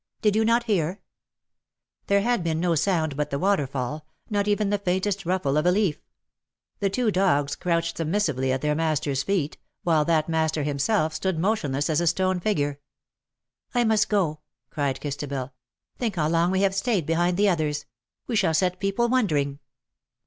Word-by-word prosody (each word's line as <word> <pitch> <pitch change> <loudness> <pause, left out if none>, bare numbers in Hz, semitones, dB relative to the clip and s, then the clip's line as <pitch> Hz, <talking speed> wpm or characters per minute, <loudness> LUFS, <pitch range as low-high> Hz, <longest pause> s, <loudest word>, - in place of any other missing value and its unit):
Did 210 -1 +3
you 220 - +3
not 230 +2 +3
hear 190 -4 0 0.6
?" - - -54
There 200 0 +3
had 240 -5 +1
been 160 -1 -1
no 175 0 +1
sound 160 -3 +1
but 150 +1 -2
the 140 - -2
waterfall 150 -5 -1
— - - -38
not 205 0 +1
even 205 -1 +1
the 205 - +1
faintest 190 0 -1
rustle 175 -6 +1
of 150 - +1
a - - +5
leaf. 185 -6 +1 0.8
The 200 - +1
two 225 +2 0
dogs 160 -7 +2
crouched 170 -1 -1
submissively 155 -6 0
at 130 0 -1
their 150 0 +1
master's 150 -3 0
feet, 180 -6 -1 0.2
while 160 -3 +3
that 155 -1 +2
master 160 -2 0
himself 155 +4 0
stood 190 -1 -1
motionless 155 -7 0
as 155 0 +1
a 170 - 0
stone 185 +2 +1
figure. 145 -8 -1 0.5
" 125 0 -46
I 245 - +4
must 220 -2 +2
go/"* 175 -8 +1 0.3
cried 140 -3 -1
Christabel. 140 -2 -4 0.2
'* - - -51
Think 230 -4 -1
how 155 -3 +1
long 170 +1 +2
we 190 +1 +1
have 195 -1 +2
stayed 195 - 0
behind 175 +3 +1
the 205 0 +4
others. 150 -4 -1 0.4
We 240 - -3
shall 185 -7 +2
set 180 +2 +1
people 195 +4 +1
wondering." 150 - +1
170 Hz, 185 wpm, -25 LUFS, 150-200 Hz, 0.8 s, a